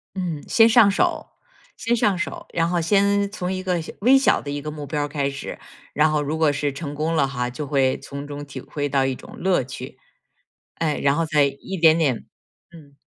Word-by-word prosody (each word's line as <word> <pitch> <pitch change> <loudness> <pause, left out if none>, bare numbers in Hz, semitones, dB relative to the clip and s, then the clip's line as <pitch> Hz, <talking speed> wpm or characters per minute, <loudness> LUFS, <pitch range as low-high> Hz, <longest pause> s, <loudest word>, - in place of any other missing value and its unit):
嗯， 175 -6 -3
先 225 -1 +6
上 215 -3 +6
手， - - 0 0.5
先 235 +1 0
上 205 -4 +2
手， 180 - -4
然 165 0 +1
后 175 -1 0
先 200 +3 +2
从 180 -3 -3
一 185 0 -3
个 180 -2 0
小 160 - -8
微 255 +5 +6
小 270 - +3
的 145 - -6
一 145 0 -4
个 150 - -5
目 150 -1 -7
标 145 +1 -2
儿 - - -2
开 145 -1 -1
始， 140 0 -7 0.4
然 155 +1 +3
后 150 -1 +1
如 150 +2 -2
果 160 -2 +3
是 145 0 -2
成 145 0 -6
功 155 +3 -1
了 140 -3 +3
哈， 125 -2 -3
就 150 +4 -5
会 135 -2 +1
从 140 +1 -8
中 145 0 -7
体 135 -2 -8
会 145 +2 -4
到 135 -1 +2
一 135 - -1
种 - - -12
乐 180 -7 +2
趣， 130 +1 -9 0.8
哎， 155 -3 -1
然 140 0 +3
后 165 - 0
再 150 -2 +3
一 140 +7 -4
点 160 -2 +5
点 140 -8 0 0.5
嗯。 145 -4 -16
150 Hz, 240 characters per minute, -22 LUFS, 140-180 Hz, 0.8 s, 先